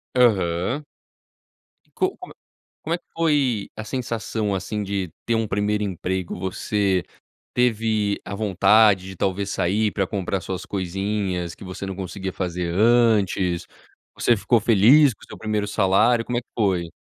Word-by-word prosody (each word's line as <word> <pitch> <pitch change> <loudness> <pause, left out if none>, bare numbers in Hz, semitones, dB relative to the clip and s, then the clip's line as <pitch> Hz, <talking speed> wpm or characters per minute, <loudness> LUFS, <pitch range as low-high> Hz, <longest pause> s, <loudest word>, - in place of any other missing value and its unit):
Aham. 105 - +2 1.0
E - - -35
co 380 0 -1
como 365 - -11
é - - -47 0.5
como 165 - -3
é 175 - -2
que - - -38
foi 145 -10 +1
a - - -3
sensação, 110 -3 -2
assim, 95 +3 -3
de 95 -3 -3
ter 115 - 0
um 115 -1 +1
1º 105 +1 0
emprego? 95 -2 -3
Você 95 0 0 0.5
teve 110 -4 +1
a 100 - -5
vontade 105 -1 +4
de 95 - -8
talvez 95 +2 -1
sair 105 +5 +1
pra 95 -2 -1
comprar 95 0 -2
suas 95 -1 -5
coisinhas, 95 -2 -2
que - - -12
você 95 +1 -6
não 95 -1 -5
conseguia 95 0 -5
fazer 90 -2 -3
antes? 105 -5 +3 0.5
Você 120 - +2
ficou 110 +3 +2
feliz 120 +6 +5
com - - -28
o - - -18
seu - - -11
1º 105 -1 -1
salário? 105 +4 +2
Como 120 - -2
é 120 - -1
que - - -51
foi? 90 -6 0
100 Hz, 160 wpm, -23 LUFS, 95-115 Hz, 1.0 s, feliz